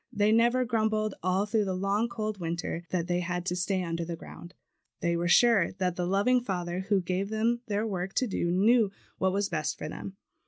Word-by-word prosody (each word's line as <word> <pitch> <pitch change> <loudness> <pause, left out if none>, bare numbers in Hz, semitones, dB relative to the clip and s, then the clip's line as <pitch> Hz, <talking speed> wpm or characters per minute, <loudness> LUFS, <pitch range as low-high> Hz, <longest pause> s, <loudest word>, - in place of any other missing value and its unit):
They 210 -2 +2
never 240 +3 +3
grumbled, 215 -2 0
all 185 +3 +1
through 210 0 +1
the 190 -1 -2
long 200 +5 0
cold 215 -3 -4
winter 170 0 -3
that 175 -3 -1
they 175 0 0
had 175 0 -3
to 180 - -1
stay 185 +1 0
under 170 0 -2
the 170 0 -4
ground. 170 +1 -12 0.4
They 170 0 0
were 170 +1 0
sure 200 0 +5
that 185 -1 -1
the 180 -1 -2
loving 205 +7 +3
Father 180 -5 -3
who 200 -3 +3
gave 185 +3 -2
them 230 +2 0
their 210 +1 0
work 190 -2 -3
to 255 - +2
do 190 -6 -1
knew 210 +4 +4 0.3
what 190 0 +2
was 200 +1 0
best 155 -2 -2
for - - -5
them. 195 +5 -7
195 Hz, 210 wpm, -29 LUFS, 175-215 Hz, 0.4 s, sure